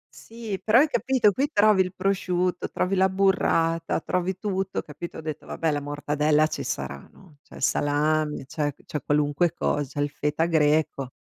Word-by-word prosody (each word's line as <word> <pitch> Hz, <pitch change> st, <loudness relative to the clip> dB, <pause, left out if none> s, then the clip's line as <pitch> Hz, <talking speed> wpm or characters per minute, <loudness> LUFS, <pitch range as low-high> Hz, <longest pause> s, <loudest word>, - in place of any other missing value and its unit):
Sì, 225 Hz, -4 st, -7 dB
però 220 Hz, +2 st, +4 dB
hai 290 Hz, +5 st, +6 dB
capito? 255 Hz, -7 st, +2 dB
Qui 275 Hz, +8 st, -1 dB
trovi 210 Hz, -5 st, +4 dB
il 185 Hz, -1 st, -1 dB
prosciutto, 185 Hz, -2 st, -1 dB
trovi 180 Hz, +2 st, -1 dB
la 190 Hz, 0 st, +3 dB
burrata, 175 Hz, -4 st, +1 dB
trovi 180 Hz, +2 st, -2 dB
tutto, 195 Hz, -1 st, -2 dB
capito? 155 Hz, +3 st, -8 dB
Ho -, -, -6 dB
detto: 155 Hz, -2 st, -6 dB
"Vabbè, 165 Hz, -1 st, -1 dB
la 145 Hz, -1 st, -2 dB
mortadella 150 Hz, +1 st, +1 dB
ci 155 Hz, -, -4 dB
sarà, 70 Hz, -1 st, -5 dB
no?" 170 Hz, -6 st, -19 dB
C'è -, -, -17 dB
il -, -, -7 dB
salame, 150 Hz, +1 st, +1 dB
c'è 150 Hz, +1 st, -2 dB
c'è 150 Hz, -, -4 dB
qualunque 145 Hz, +3 st, +1 dB
cosa, 145 Hz, 0 st, -2 dB
il 145 Hz, 0 st, -1 dB
feta 150 Hz, +3 st, -1 dB
greco. 150 Hz, -4 st, +1 dB
165 Hz, 170 wpm, -25 LUFS, 150-190 Hz, -, hai